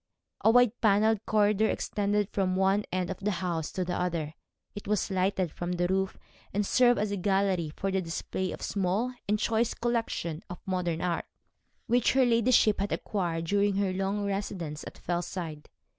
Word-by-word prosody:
A - - +6
wide 245 0 +4
panelled 215 0 +3
corridor 210 0 +3
extended 205 0 0
from 185 -2 0
one 195 +2 +2
end 185 -1 -1
of - - -6
the 200 - -1
house 170 -3 -2
to 185 - -1
the 175 - -2
other. 165 -4 -2 0.4
It 205 - -8
was 210 -1 0
lighted 185 -2 0
from 175 +1 -4
the 175 0 0
roof, 190 +1 0 0.3
and 205 +1 0
served 245 +3 +4
as 210 -1 -1
a 205 - -1
gallery 190 -4 +1
for 195 - -2
the 190 0 +1
display 185 +2 -3
of - - -7
a - - -6
small 200 +6 0 0.2
and 210 - +3
choice 225 +2 +1
collection 225 -9 -2
of 180 - -6
modern 180 -3 -1
art, 175 -2 -1 0.6
which 240 0 +3
her 260 -1 +4
ladyship 230 -2 +4
had 200 +1 -1
acquired 170 -5 -2
during 200 +2 +2
her 195 -1 +1
long 195 +2 -1
residence 190 -6 -3
at - - -10
Fellside. 175 -3 -4
195 Hz, 180 wpm, -29 LUFS, 180-210 Hz, 0.6 s, A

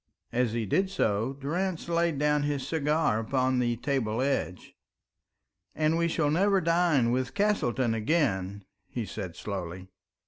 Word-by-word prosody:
As 120 -2 +1
he 115 -1 -1
did 190 - +1
so, 115 - 0
Durrance 165 +7 -3
laid 170 -2 +1
down 150 +1 +2
his 145 -2 -2
cigar 150 -6 +1
upon 130 +2 +1
the 120 -1 +1
table 120 -3 -1
edge. 135 -9 -2 1.0
"And 155 +1 +2
we 170 0 +2
shall 155 -3 +1
never 195 +4 +3
dine 165 -8 +2
with 130 +4 -1
Castleton 135 - +1
again," 105 - 0 0.2
he 115 +3 -4
said 95 -3 -6
slowly. 95 -2 -6
135 Hz, 140 wpm, -28 LUFS, 115-160 Hz, 1.0 s, never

